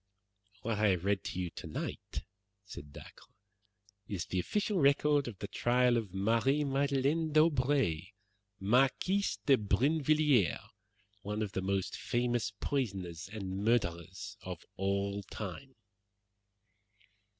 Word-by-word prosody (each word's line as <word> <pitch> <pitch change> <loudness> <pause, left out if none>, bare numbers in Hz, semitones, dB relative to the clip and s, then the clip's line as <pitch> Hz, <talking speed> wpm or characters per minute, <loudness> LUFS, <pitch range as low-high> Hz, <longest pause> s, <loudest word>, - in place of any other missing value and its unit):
"What 110 -2 -1
I 105 - +4
have 90 -2 +1
read 100 -1 +1
to 90 - -4
you 90 -2 -2
tonight," - - -5 0.4
said 75 -8 -10
Dacre, - - -12 0.8
"is 95 -4 -3
the 95 - -2
official 205 - 0
record 145 0 +4
of 110 -5 -6
the 100 - -5
trial 125 +2 +2
of 110 -5 -2
Marie 115 +9 +2
Madeleine 140 +3 +1
d'Aubray, 140 - +3 0.5
Marquise 135 - +2
de 135 -2 +6
Brinvilliers, 140 - +3 0.6
one 105 +1 -2
of 105 - -4
the 95 - -2
most 95 0 -1
famous 120 -3 0
poisoners 95 - -2
and 100 -2 -4
murderers 100 -3 -1
of 90 -3 -7
all 100 +1 -1
time." - - -7
110 Hz, 115 wpm, -32 LUFS, 95-140 Hz, 0.8 s, de